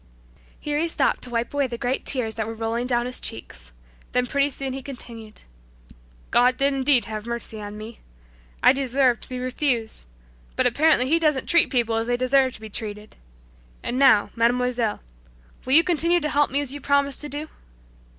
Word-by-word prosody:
Here 295 0 -2
he 335 - +1
stopped 330 - 0
to 250 - -2
wipe 235 +1 -2
away 285 -2 +1
the 235 -1 -6
great 250 +1 -2
tears 245 -5 +2
that 220 -1 -4
were 225 - -6
rolling 230 +2 -2
down 240 -1 0
his 250 0 -1
cheeks. 60 - -5 0.4
Then 250 0 +2
pretty 280 +2 +1
soon 270 -1 -5
he 270 - -5
continued, 230 -5 -10 0.9
"God 250 +1 +4
did 275 +1 +2
indeed 265 -2 +2
have 215 0 -6
mercy 235 -2 -6
on 205 0 -8
me. 220 +2 -10 0.6
I - - +7
deserved 265 -2 +1
to - - -11
be 255 - -5
refused, 250 - -2 0.5
but - - +1
apparently 305 -4 +3
He 325 +4 +3
doesn't 300 -5 +1
treat 340 -2 +3
people 235 -4 0
as 225 +1 -2
they 245 0 0
deserve 260 +1 +2
to - - -12
be 220 - -7
treated, 210 -1 -6 0.7
and 250 - -2
now, 260 -7 +5
mademoiselle, 240 -1 0 0.6
will 260 - 0
you 325 +3 +9
continue 345 0 +2
to 300 - -2
help 290 0 +2
me 280 +2 +2
as 280 -2 -3
you 290 - -7
promised 280 0 +1
to 295 - -5
do?" 295 +2 -5
250 Hz, 190 wpm, -23 LUFS, 230-280 Hz, 0.9 s, you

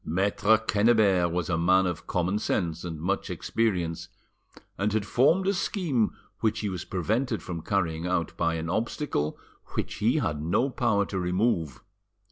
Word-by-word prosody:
Maitre 100 +5 +2
Quennebert 105 -5 +3
was 85 -2 -1
a 80 -2 0
man 95 +3 +4
of 90 -3 -4
common 90 +3 0
sense 85 -5 -1
and 80 -3 -5
much 95 +5 -1
experience, 90 -8 -1 0.7
and 105 +2 0
had 110 -2 0
formed 155 - +3
a 195 - +2
scheme 165 - 0 0.2
which 110 0 0
he 105 - -1
was 90 -4 -5
prevented 110 +6 -1
from 85 -3 -5
carrying 85 -3 -1
out 90 -3 -1
by 85 -1 0
an 80 0 -3
obstacle 110 - -1 0.4
which - - -3
he - - +2
had 75 -1 -1
no 95 - +1
power 100 -4 +1
to 95 - -3
remove. 90 - 0
95 Hz, 160 wpm, -27 LUFS, 85-110 Hz, 0.7 s, man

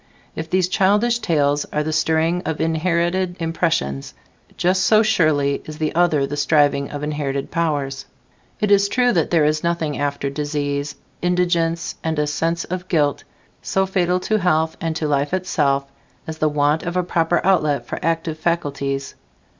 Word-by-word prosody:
If 160 0 -5
these 185 0 +2
childish 210 +5 +2
tales 145 -7 +1
are 150 - -2
the 155 +1 -2
stirring 160 +2 +1
of 160 - -4
inherited 170 +2 0
impressions, 165 - -1 0.4
just 185 +1 +2
so 215 +2 +5
surely 155 -10 +2
is 155 -1 -8
the 155 -1 -1
other 160 -5 +2
the 140 +1 -4
striving 145 -1 +2
of 145 0 -6
inherited 145 -2 -3
powers. 145 -5 -2 0.5
"It 210 -1 0
is 200 0 +4
true 245 +3 +2
that 165 -7 +1
there 165 -3 +3
is 155 +1 +1
nothing 170 -3 -1
after 140 -1 -2
disease, 145 0 -2 0.3
indigence 175 -2 0
and 160 -1 -1
a 150 - +2
sense 165 +3 -1
of 185 +1 -5
guilt, 145 -6 +1 0.4
so 190 0 0
fatal 180 -1 +1
to 215 +2 0
health 160 -3 +1
and 165 -1 -2
to 155 -1 -1
life 145 +3 0
itself 145 -7 0 0.4
as 160 0 -7
the 155 - +2
want 150 +1 +1
of 175 +1 -3
a 180 - +2
proper 170 0 +1
outlet 150 -9 +2
for - - -5
active 165 -1 -1
faculties." 140 -5 -2
160 Hz, 165 wpm, -21 LUFS, 145-175 Hz, 0.5 s, so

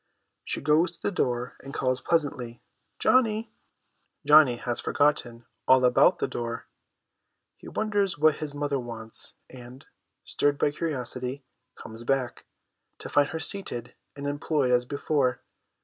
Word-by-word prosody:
She - - -2
goes 155 +4 +3
to 170 - -19
the - - -2
door, 125 -8 -2
and 135 0 -9
calls 130 -1 0
pleasantly, 140 -7 -1 0.2
' - - -49
Johnny! 225 -3 +2 0.3
' - - -45
Johnny 150 -5 +7
has 120 0 -2
forgotten 120 -5 0 0.2
all 130 -1 +6
about 125 +8 +5
the - - -1
door; 115 0 -5 0.9
he - - -14
wonders 205 -4 0
what 155 0 +3
his 145 -2 -3
mother 145 -1 -1
wants, 115 -2 -2
and, 125 +1 -13 0.4
stirred 145 0 +1
by 145 - +1
curiosity, 135 -3 -3 0.3
comes 110 +1 -10
back, 130 0 -2 0.5
to - - -9
find 145 0 +3
her 160 - -4
seated 125 - -1 0.2
and 140 0 -7
employed 145 -2 0
as 125 0 +3
before. 140 -2 -1
140 Hz, 145 wpm, -27 LUFS, 125-155 Hz, 0.9 s, Johnny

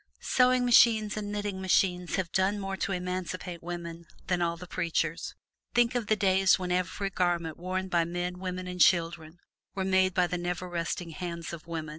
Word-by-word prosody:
Sewing 250 -1 +4
machines 225 -3 +5
and 205 -1 -4
knitting 205 -2 -3
machines 180 -1 +1
have 180 -3 -2
done 195 +2 +1
more 195 -1 -3
to 195 - -2
emancipate 180 -1 -4
women 170 -1 -7 0.2
than 180 -1 0
all 170 0 0
the 180 - -9
preachers. 170 -2 -2 0.4
Think 240 -1 +4
of 240 -4 -2
the 215 - +3
days 190 -1 +4
when 180 -1 -4
every 185 +2 -1
garment 175 -4 0
worn 185 +2 -3
by 175 -2 +2
men, 175 +1 -3
women 185 0 -4
and 180 0 -4
children 165 -2 +2 0.4
was 190 -1 -1
made 190 -1 +2
by 180 - +4
the 180 0 -3
never 175 +1 -3
resting 170 0 -3
hands 170 -1 -5
of 165 -1 -9
women! 160 -2 -4
180 Hz, 185 wpm, -29 LUFS, 170-190 Hz, 0.4 s, machines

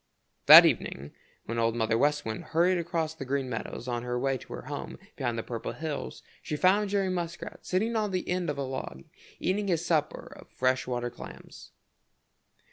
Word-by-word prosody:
That - - +12
evening, 70 +2 -1 0.3
when 115 +1 -3
Old 115 0 +1
Mother 115 -1 +1
West 150 +5 +1
Wind 110 -1 -4
hurried 175 +2 +2
across 165 -2 -2
the 160 -3 -7
Green 135 0 -1
Meadows 115 +1 -5
on 120 -1 -2
her 125 0 -3
way 135 +2 0
to - - -11
her - - -7
home - - -6 0.2
behind 120 -1 -2
the 115 - -2
Purple 115 -2 -5
Hills, 155 -2 -5 0.2
she 150 - -4
found 195 +5 +3
Jerry 195 -1 +1
Muskrat 175 -1 -5
sitting 220 +6 0
on 215 -2 +1
the 185 -1 -3
end 180 -1 -1
of - - -3
a 140 - -2
log 130 - -6 0.4
eating 200 +2 0
his 170 -2 0
supper 155 -4 -1
of - - -15
fresh 130 0 0
water 120 -1 -2
clams. 120 - -11
150 Hz, 190 wpm, -28 LUFS, 120-180 Hz, 0.4 s, That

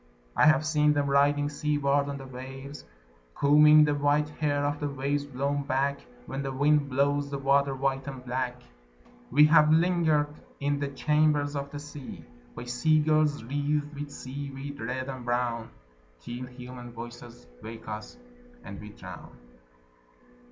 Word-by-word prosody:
I - - +5
have 155 -1 +4
seen 150 -1 +3
them 145 -1 0
riding 145 +1 +3
seaward 145 -1 0
on 140 - -4
the 135 - -9
waves 135 +2 -9 0.5
Combing 150 +1 +7
the 150 - +1
white 145 +1 +1
hair 145 -1 -1
of 145 0 -1
the 145 - -2
waves 140 +1 -2
blown 140 +1 -2
back 140 +1 0 0.3
When 135 +1 -4
the 135 -1 -3
wind 145 +1 +2
blows 140 +2 +1
the 140 - -3
water 140 0 +2
white 135 0 -1
and 130 -2 -7
black. 125 0 -2 0.7
We 150 - +6
have 150 0 +6
lingered 160 -3 +3 0.3
in 145 0 0
the 140 - -1
chambers 150 +1 +1
of 140 0 -3
the 145 - -7
sea 145 -2 -9 0.3
By 120 - -6
sea 125 +6 +2
girls 155 -3 +2
wreathed 145 +3 -1
with 145 0 -6
seaweed 140 +1 -7
red 130 +3 -3
and 130 -2 -6
brown 120 -1 -1 0.5
Till 120 - -7
human 125 -1 -10
voices 120 - -10 0.2
wake 115 +1 -9
us, 110 - -7 0.5
and 100 - -9
we 105 - -9
drown. 105 - -11
140 Hz, 155 wpm, -28 LUFS, 130-145 Hz, 0.7 s, Combing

